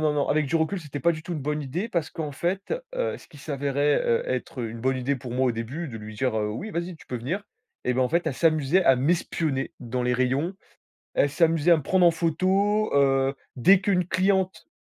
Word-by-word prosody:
non, 155 -1 +2
non, 145 - 0
avec 150 -1 +2
du 165 - +1
recul 165 +4 0
c'était 145 -2 -7
pas 170 0 +3
du 155 - -7
tout 175 +1 -5
une - - -3
bonne 150 +2 -2
idée 175 - -4
parce 165 -3 -1
qu'en 150 -3 -5
fait, 180 +7 -2 0.2
heu, - - -1
ce - - -18
qui - - -15
s'avérait, 145 0 0
heu, 115 - +2
être 130 0 -3
une 115 0 -5
bonne 130 +1 +1
idée 135 +2 -1
pour 125 -2 -7
moi 130 +2 +1
au 125 - +2
début, 120 +9 -4
de 115 -6 -7
lui 105 0 -9
dire, 125 +2 0
heu: 105 0 0
«Oui 175 - -5
vas 170 - -2
y 175 -1 -7
tu - - -18
peux 125 - -4
venir» 170 - -3 0.4
et 125 - +1
bah 130 - 0
en 125 - +2
fait, 170 +1 0
elle - - +1
s'amusait 155 +4 +2
à 135 -5 +5
m'espionner 150 -1 0
dans 125 0 -3
les 125 0 +1
rayons. 135 +9 0 0.6
Elle 145 - +3
s'amusait 165 +1 +3
à 170 - +7
me - - -3
prendre 180 +5 +3
en 170 - +7
photo, 190 +6 +1
heu, 135 -1 +3 0.2
dès 185 +10 +5
qu'une 185 -3 +1
cliente 190 0 +1
150 Hz, 245 wpm, -25 LUFS, 130-175 Hz, 0.6 s, à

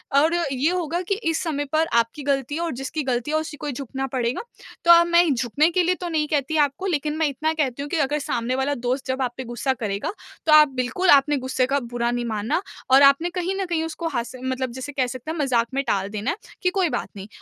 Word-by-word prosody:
और 310 +4 +4
ये 280 -3 0
होगा 350 -1 -1
कि 390 +2 -1
इस 325 - 0
समय 295 -4 -2
पर 320 +1 +3
आपकी 230 +5 -2
ग़लती 275 +1 -1
और 340 -1 -1
जिसकी 270 +4 -4
ग़लती 255 +1 -1
है 310 - +2
उसी 315 -1 -4
को 295 - -5
झुकना 270 +1 -4
पड़ेगा। 245 -1 -1 0.4
तो 340 - +8
अब 340 0 +7
मैं 345 0 +4
झुकने 260 +6 +2
के 360 +1 +2
लिए 360 +1 +2
तो 350 - -3
नहीं 310 -2 0
कहती 300 +1 0
आपको 285 +7 -7
लेकिन 300 -3 -1
मैं 320 -1 +2
इतना 305 +3 -1
कहती 280 -4 -1
हूँ 290 - -5
कि - - -1
अगर 295 0 +1
सामने 245 -2 -2
वाला 270 +2 0
दोस्त 250 +2 -2
जब 260 +1 -1
आप 250 -2 -1
पे 260 - -4
ग़ुस्सा 240 +2 -1
करेगा, 220 - -3 0.3
तो 315 - +3
आप 305 0 +8
बिल्कुल 255 +9 0
आपने 285 +1 +5
ग़ुस्से 260 0 0
का 280 +2 +1
बुरा 240 -1 -2
नहीं 240 0 -2
मानना 220 - -1 0.3
और 265 +1 +7
आपने 280 +5 +5
कहीं 365 +1 -1
न - - -1
कहीं 340 -3 -1
उसको 325 +1 -4
हास 235 -5 -3
मतलब 260 -1 -2
जैसे 260 +4 -6
कह 260 -2 +1
सकते 255 +4 -6
हैं 325 - -5
मज़ाक 245 -5 +1
में 275 +1 0
टाल 195 0 0
देना 210 +6 -2
है 355 - -5 0.2
कि 365 - +2
कोई 365 -2 +1
बात - - -3
नहीं 195 0 -8
280 Hz, 250 wpm, -23 LUFS, 255-320 Hz, 0.4 s, तो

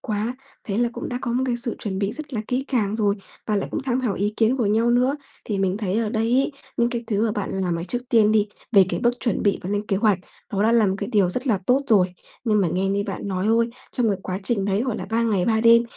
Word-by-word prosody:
quá. 220 +2 -2 0.3
Thế 200 -1 -3
là 240 0 +2
cũng - - -5
đã 245 - -3
có 235 - -2
một 255 +2 +1
cái 240 -1 0
sự 235 -1 -2
chuẩn 190 -3 -3
bị 200 +1 -1
rất 295 -4 -7
là 215 - 0
kỹ 255 +2 0
càng 220 -5 0
rồi 205 -2 +2 0.3
và 210 -2 +1
lại 195 - -2
cũng - - -3
tham 260 -1 0
khảo 230 -7 0
ý 205 +2 -1
kiến 230 +3 +3
của 235 -5 +1
nhau 225 +3 +2
nữa. 250 +3 +3 0.3
Thì 205 -3 -2
mình 190 0 +1
thấy 210 0 -1
ở 225 -2 0
đây 220 0 0
ấy, 270 +3 +2 0.2
những 235 0 +2
cái 235 -1 -3
thứ 210 -1 0
mà 215 - -1
bạn 205 -3 -3
làm, 180 -3 -1
ờ, 170 - -4
trước 245 - -2
tiên 215 -2 +4
đi, 210 -1 +3 0.3
về 195 -3 +7
cái - - -2
bước 245 0 +1
chuẩn 235 -6 0
bị 200 - +2
và 185 - -4
lên 205 +1 -1
kế 195 - +1
hoạch, 205 -2 +3 0.3
nó 200 +1 +1
đã 225 +2 +3
là 225 -3 +4
một 190 - +1
cái 200 - -3
điều 200 -4 +4
rất 255 +8 -3
là 215 -6 +2
tốt 255 +3 +4
rồi. 185 -6 +3 0.3
Nhưng 210 -2 +3
mà 180 - +2
nghe 185 +4 0
như 200 +1 0
bạn 200 - -4
nói 185 0 -2
thôi, 230 +1 +3 0.2
trong 240 -3 +1
cái 195 -2 0
quá 185 0 -3
trình 200 -2 0
đấy, 200 +3 +1
gọi 250 -4 -2
là, - - -5
3 230 +1 +2
ngày 205 -6 +1
3 220 -1 +2
đêm, 235 0 +7
215 Hz, 295 wpm, -23 LUFS, 200-240 Hz, 0.3 s, về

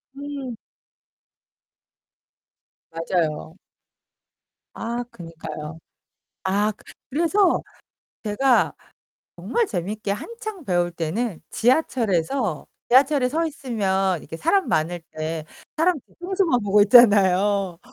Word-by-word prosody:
음. 275 -4 -6 2.3
맞아요. 165 -1 -2 1.2
아, 235 +1 -3
그니까요. 160 -2 -8 0.7
아, 205 +3 +1 0.4
그래서 340 +6 +2 0.6
제가 240 +4 +2 0.6
정말 470 -1 0
재밌게 205 - -3
한창 435 - -7
배울 175 -4 +1
때는 175 +4 -3
지하철에서 225 - +1 0.2
지하철에 265 +1 +4
서 320 +5 0
있으면 195 - -1
이렇게 160 +3 -8
사람 375 - +1
많을 170 +2 0
때 155 0 -4 0.3
사람 335 +1 +2
뒤통수만 355 -7 0
보고 205 0 +4
있잖아요. 200 -4 +5
210 Hz, 195 characters per minute, -23 LUFS, 175-275 Hz, 2.3 s, 있잖아요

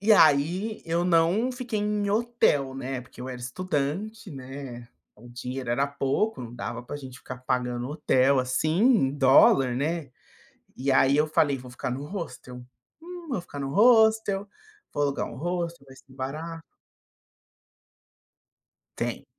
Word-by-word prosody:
E 215 +2 +4
aí, 175 +6 +4
eu 170 +1 0
não 180 +8 +3
fiquei 245 -4 -4
em 210 -1 0
hotel, 210 - +1
né, 135 -1 -4
porque 125 -1 -15
eu 130 - -5
era 125 -1 -6
estudante, 185 - -3
né, 130 -3 -8 0.3
o 120 +3 -14
dinheiro 125 +1 -6
era 135 +4 +2
pouco, 140 +11 -1
não 120 -1 -8
dava 120 0 -5
pra 125 - -7
gente 130 -3 -10
ficar 130 - -8
pagando 125 -1 -2
hotel, 140 -2 +2
assim, 130 +5 0
em 225 - +4
dólar 135 -2 +5
né, 150 +3 -2 0.7
e 135 +2 -2
aí 135 +1 +4
eu 150 +1 +3
falei 150 -2 +2
vou 125 0 -11
ficar 120 - -4
no 135 +3 -4
hostel. 145 -8 -7 0.4
Hum, 350 0 -9
vou 235 -9 -2
ficar 145 -4 -9
no 135 -1 -3
hostel, 220 -3 +4 0.5
vou 145 - 0
alugar 140 -1 -1
um - - -9
hostel, 170 -1 -3
vai 135 -1 -14
ser 135 - -19
barato. 155 +5 -6 2.3
Tem. - - -3
145 Hz, 150 wpm, -26 LUFS, 130-195 Hz, 2.3 s, dólar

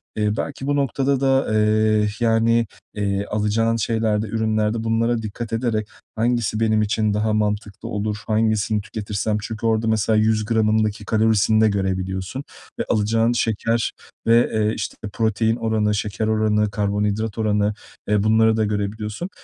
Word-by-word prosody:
eee, 105 -1 0
belki 135 -1 -4
bu 145 - +1
noktada 140 0 +1
da, 135 -3 +2
eee, 110 0 +3
yani, 115 0 +2 0.3
eee, 100 -1 -1
alacağın 105 +2 0
şeylerde, 110 -1 0
ürünlerde 110 0 0
bunlara 115 +1 +1
dikkat 110 +1 -6
ederek, 115 -2 -1 0.3
"Hangisi 115 -1 0
benim 110 -1 +2
için 105 0 0
daha 105 +1 0
mantıklı 105 +1 -2
olur, 105 -1 -2
hangisini 110 -1 +1
tüketirsem?" 105 0 -3
Çünkü 110 +1 -5
orada 115 0 +1
mesela 110 0 +2
100 110 0 +2
gramındaki 110 -2 +1
kalorisini 110 0 +3
de 110 - +5
görebiliyorsun 95 +4 -2 0.4
ve - - +1
alacağın 115 +2 +2
şeker 115 0 0 0.4
ve, 115 +1 +5
eee, 110 0 +1
işte, - - -4 0.2
protein 110 0 +1
oranı, 110 -2 0
şeker 105 +1 -2
oranı, 105 -1 +1
karbonhidrat 105 +1 -1
oranı, 105 -1 +1 0.4
eee, 105 -1 +2
bunları 110 0 +4
da 110 - +2
görebiliyorsun. 105 - -3
110 Hz, 140 wpm, -22 LUFS, 105-115 Hz, 0.4 s, de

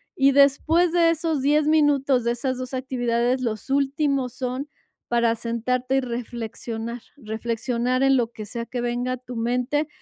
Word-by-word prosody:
Y 275 -5 +4
después 310 +5 +4
de 335 -1 +4
esos 320 -3 0
10 295 +2 +3
minutos, 285 -5 +3
de 235 - +1
esas 260 +1 -2
2 255 +1 -6
actividades, 245 -1 0
los 230 +1 -3
últimos 275 -2 +1
son 260 +3 -4 0.4
para 235 -1 +2
sentarte 250 +3 -1
y - - +4
reflexionar, 235 -1 -5 0.2
reflexionar 235 +2 -1
en 270 0 +5
lo 240 - +1
que 215 -2 -8
sea 235 +2 -5
que 245 -1 -4
venga 245 +1 -1
a 255 - -4
tu 250 0 -10
mente 250 +6 0
255 Hz, 160 wpm, -24 LUFS, 235-275 Hz, 0.4 s, en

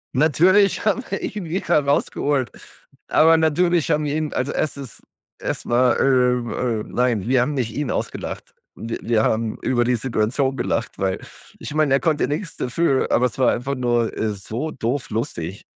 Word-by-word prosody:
Natürlich 180 +9 +3
haben 215 +4 +1
wir - - -3
ihn 210 -3 -4
wieder 170 -2 0
rausgeholt, 140 -1 0 0.6
aber 165 +1 +5
natürlich 160 +1 +2
haben 150 0 +1
wir 145 +1 -1
ihn 155 -1 -2
also, 130 +2 -1
erst 155 - -1
ist 135 -5 -9 0.4
erst - - -4
mal, 120 +1 +3
ähm, 125 -3 +2
äh 115 -4 -1
nein, 120 -5 0
wir 130 -1 +4
haben 145 +4 -1
nicht 120 -5 -2
ihn 145 -3 -1
ausgelacht. - - -5 0.2
Wir 115 +1 -5
wir 110 -2 +2
haben 110 0 0
über 120 -2 +1
die 125 +1 +2
Situation 125 +3 0
gelacht, - - -2
weil 95 -1 -1 0.4
ich - - -6
meine, 150 -3 +3
er - - +3
konnte 155 -3 +1
nix 150 +3 -4
dafür, 135 +2 +1
aber 125 - +4
es 125 - -5
war 130 - +4
einfach 135 +3 -3
nur, 120 -2 0
äh, 110 - 0
so 110 +10 -5
doof 125 +2 -3
lustig, 95 -5 -4
130 Hz, 180 wpm, -22 LUFS, 120-150 Hz, 0.6 s, aber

